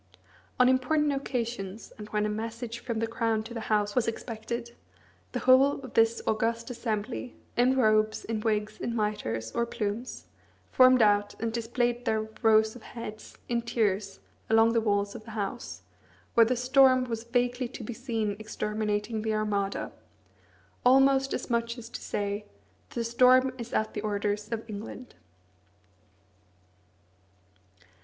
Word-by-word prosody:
On 250 - +6
important 285 +3 +2
occasions, 235 -7 -4
and 210 -1 -9
when 210 0 0
a - - +1
message 230 +2 -4
from 235 -1 -4
the 230 - 0
Crown 225 -1 -1
to 230 +2 -9
the 235 - -4
House 205 -1 +2
was 250 -3 +2
expected, 230 +1 -5 0.6
the - - -3
whole 265 +2 +5
of 260 -3 -10
this 225 0 +3
august 230 +3 0
assembly 230 +1 -3 0.2
in 255 +2 +3
robes, 215 -3 +2
in 225 -1 -2
wigs, 215 -1 -1
in 235 - -2
mitres, 115 - -2
or 235 0 -1
plumes 225 +2 -4 0.5
formed 255 -2 +6
out, 205 -1 +2
and 225 -1 -2
displayed 240 +1 -1
their 220 -3 0
rows 220 -1 +4
of 245 - -11
heads, 215 -2 -9
in 235 -1 0
tiers, 205 -4 -1 0.3
along 225 +1 +5
the 230 - +3
walls 205 -2 0
of - - -9
the 220 0 -9
House, 205 +4 -4 0.5
where 230 -1 +6
the 255 - +1
storm 255 +1 +5
was 230 -2 -4
vaguely 245 +1 0
to 235 0 -9
be 240 - -5
seen 225 -4 -2
exterminating 215 0 -2
the 220 0 -1
Armada 205 -2 -1 0.9
almost 270 +1 +5
as - - -3
much 235 0 -1
as 230 -1 -9
to - - -7
say, 205 +1 -3 0.5
"The 235 - -3
storm 255 +2 +4
is 235 0 -6
at 220 - 0
the 210 - -3
orders 210 0 -2
of 225 0 -4
England." 220 +4 -8
230 Hz, 150 wpm, -28 LUFS, 215-245 Hz, 0.9 s, On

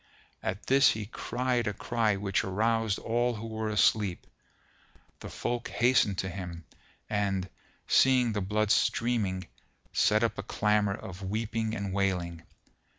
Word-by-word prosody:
At 95 - -4
this 135 -1 +5
he 110 -1 -5
cried 125 +2 -2
a 105 - -1
cry 115 -4 0
which 95 -1 0
aroused 110 +2 +1
all 120 +1 0
who 110 +1 -6
were 110 -1 -3
asleep; 105 -3 +2 0.9
the - - -8
folk 120 -1 -3
hastened 120 -5 +3
to 95 - -2
him 85 -3 -7 0.4
and, 100 -3 -1 0.4
seeing 125 -3 +4
the 105 - -1
blood 105 +2 0
streaming, 105 -8 +1 0.5
set 105 +2 +3
up 110 -3 0
a - - 0
clamour 105 -1 +1
of 95 0 -9
weeping 110 +3 -2
and 100 -2 -4
wailing. 90 -4 -1
105 Hz, 140 wpm, -29 LUFS, 95-115 Hz, 0.9 s, this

